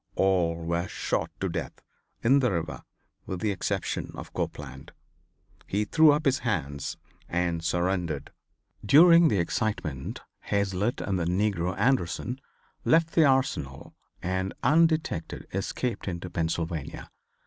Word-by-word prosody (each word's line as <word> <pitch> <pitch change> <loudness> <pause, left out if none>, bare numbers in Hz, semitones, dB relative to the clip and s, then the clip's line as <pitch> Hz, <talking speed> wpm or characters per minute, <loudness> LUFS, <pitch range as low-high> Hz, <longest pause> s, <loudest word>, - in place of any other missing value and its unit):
All 90 -4 +2
were 85 +2 -2
shot - - -2
to - - +1
death - - -4 0.4
in 135 +4 +5
the 125 -4 +2
river 80 -3 -3 0.5
with 95 - -4
the 105 +1 0
exception 95 - -2
of - - -9
Copeland. - - -5 0.7
He 105 +2 0
threw 155 +7 +6
up 150 +2 0
his 135 -1 +3
hands 70 - -2 0.3
and 85 -1 -1
surrendered. 85 -4 -1 0.5
During 165 - +7
the 105 - +2
excitement 85 -6 -2 0.2
Hazlitt 100 +4 -1
and 95 -2 -1
the 85 - -1
negro 90 0 0
Anderson 125 +1 0 0.4
left 165 0 +3
the 160 - +5
Arsenal 130 - 0 0.3
and, 95 +1 -2
undetected, 155 - +2
escaped 100 +4 -3
into 90 -1 -4
Pennsylvania. 80 -2 -3
95 Hz, 125 wpm, -27 LUFS, 85-130 Hz, 0.7 s, During